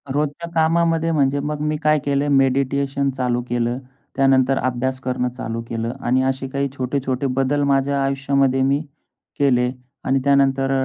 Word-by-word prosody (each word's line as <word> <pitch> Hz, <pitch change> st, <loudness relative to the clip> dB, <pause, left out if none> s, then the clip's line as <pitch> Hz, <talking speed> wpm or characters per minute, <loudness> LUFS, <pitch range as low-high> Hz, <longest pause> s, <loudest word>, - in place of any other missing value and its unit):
रोजच्या 150 Hz, +3 st, -2 dB
कामामध्ये 165 Hz, 0 st, +2 dB
म्हणजे 140 Hz, -2 st, +1 dB
मग 150 Hz, +1 st, -3 dB
मी 150 Hz, 0 st, -1 dB
काय 155 Hz, -1 st, +3 dB
केले, 140 Hz, 0 st, +1 dB
मेडिटेशन 140 Hz, 0 st, +1 dB
चालू 125 Hz, -1 st, 0 dB
केलं, 120 Hz, +1 st, -1 dB, 0.4 s
त्यानंतर 135 Hz, -1 st, +3 dB
अभ्यास 130 Hz, +1 st, -1 dB
करणं 125 Hz, -1 st, -1 dB
चालू 115 Hz, -1 st, -5 dB
केलं. 115 Hz, +1 st, -3 dB
आणि 130 Hz, +2 st, +1 dB
असे 135 Hz, 0 st, -1 dB
काही 140 Hz, 0 st, -1 dB
छोटे-छोटे 130 Hz, +1 st, -1 dB
बदल 135 Hz, +2 st, 0 dB
माझ्या 140 Hz, 0 st, +1 dB
आयुष्यामध्ये 135 Hz, -1 st, +1 dB
मी 140 Hz, +2 st, +2 dB, 0.6 s
केले 125 Hz, -3 st, +3 dB, 0.3 s
आणि 135 Hz, +1 st, +1 dB
त्यानंतर 135 Hz, -1 st, +2 dB
135 Hz, 145 wpm, -21 LUFS, 130-140 Hz, 0.6 s, काय